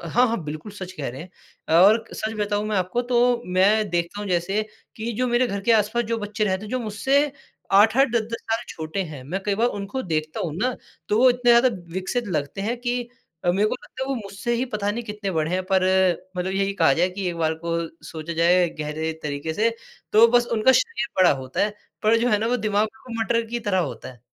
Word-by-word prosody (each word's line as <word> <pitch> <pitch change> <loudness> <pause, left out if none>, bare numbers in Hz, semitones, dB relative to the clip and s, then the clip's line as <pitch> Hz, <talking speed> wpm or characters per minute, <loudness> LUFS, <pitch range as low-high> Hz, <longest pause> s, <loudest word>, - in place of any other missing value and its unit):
हाँ, 240 +10 +3
हाँ, 225 -6 -2
बिल्कुल 155 +7 -7
सच 185 -2 -7
कह 150 -7 -4
रे 125 +2 -7
हैं। 165 -1 -4
और 215 +4 +6
सच 220 0 -3
बताऊँ 205 0 0
मैं 215 - 0
आपको 185 +6 0
तो 245 0 +2
मैं 205 +3 +4
देखता 175 +3 -2
हूँ 205 - -5
जैसे 185 +4 0 0.3
कि 230 +2 -3
जो 255 - +2
मेरे 240 +1 +2
घर 200 -3 -3
के - - +7
आस-पास 225 +2 +2
जो 230 +1 -2
बच्चे 210 0 -2
रहते 190 -1 -1
हैं 210 - -8
जो 255 - 0
मुझसे 265 +6 +1 0.4
8-8 220 +7 +5
10-10 230 0 -1
साल 225 +1 +1
छोटे 160 +4 -4
हैं, 155 -7 -8
मैं 180 +8 -3
कई 205 0 0
बार 230 +4 +2
उनको 200 +7 -4
देखता 155 0 -2
हूँ 155 -4 -3
ना, 250 +5 0 0.3
तो 210 - +2
वो 255 +1 +7
इतने 245 0 +2
ज़्यादा 235 +2 +6 0.2
विकसित 190 +7 -2
लगते 155 +1 -2
हैं 230 +4 -1
कि 245 0 -1 0.4
अ, 175 - +4
मेरे 200 +4 +2
को - - -2
लगता 260 - -8
है 265 - -3
वो 275 - 0
मुझसे 200 +1 -4
ही 240 +2 0
पता 205 -1 0
नहीं 235 +3 -4
कितने 210 -2 -4
बड़े 160 -2 -1
हैं, 185 +1 0
पर 190 0 +2 0.5
मतलब 180 +1 -2
यही 195 +1 0
कहा 140 - +4
जाए 170 +6 +2
कि 190 +1 -5
एक 175 - -4
बार 160 -1 +1
को 170 0 0 0.3
सोचा 160 0 -6
जाए 175 +2 +4
गहरे 155 +1 -3
तरीके 145 +2 -3
से, 225 +5 +2 0.4
तो 225 +2 +7
बस 240 0 +3
उनका 230 +3 +4
शरीर 460 - +1
बड़ा 185 -1 +6
होता 130 0 -4
है। 210 0 -3 0.3
पर 220 +2 +4
जो 240 +2 +1
है 210 - +3
ना 220 - -1
वो 245 +2 +1
दिमाग 210 -1 +1
बिल्कुल 220 +2 -11
मटर 230 0 +1
की 240 +1 -3
तरह 205 -4 0
होता 145 -6 -4
है। 120 - -21
205 Hz, 235 wpm, -23 LUFS, 180-235 Hz, 0.5 s, के